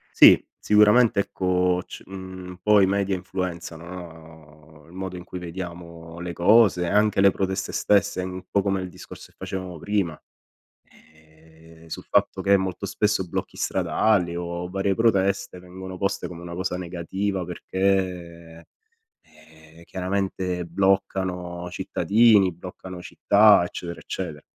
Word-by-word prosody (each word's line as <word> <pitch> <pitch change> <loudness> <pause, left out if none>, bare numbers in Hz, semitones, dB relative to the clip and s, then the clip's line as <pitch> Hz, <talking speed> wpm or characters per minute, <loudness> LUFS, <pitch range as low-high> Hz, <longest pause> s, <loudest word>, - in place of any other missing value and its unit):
Sì, - - +8
sicuramente 105 +1 +4
ecco 90 -2 0
c - - -10
mhmm, 95 -1 -9
un 90 0 -10
po' 105 +1 +5
i 95 - +5
media 100 0 0
influenzano, 90 -2 -5
no, 80 -3 -13
il 85 - -18
modo 95 0 -6
in 90 - -9
cui 90 - -7
vediamo 85 -1 -8
le 90 0 -4
cose, 95 0 +4
anche 105 +2 +2
le 100 0 +6
proteste 95 0 -3
stesse, 100 -2 +2
un 90 0 -6
po' 100 - +2
come 95 -1 0
il 90 - -5
discorso - - -12
che - - -30
facevamo 95 -2 -6
prima. 95 -3 -2 0.6
Ehm, 80 +1 -21
sul - - -7
fatto 95 - +1
che 100 +1 +4
molto 95 +1 -3
spesso 100 -1 0
blocchi - - -5
stradali 90 -6 +1
o 85 0 -4
varie 95 +1 0
proteste 100 -4 +1
vengono 95 +1 -9
poste 100 -1 -2
come 85 -1 -10
una 85 0 -8
cosa 90 +1 -2
negativa, 90 +2 -3
perché, 90 -3 -3 0.5
eh, 80 +1 -19
chiaramente 95 -1 -2
bloccano 90 -1 -1
cittadini, 105 +1 +3
bloccano 90 +1 -9
città, 100 +3 +5
eccetera, 85 0 -7
eccetera. 80 -6 -5
90 Hz, 135 wpm, -24 LUFS, 85-95 Hz, 0.6 s, Sì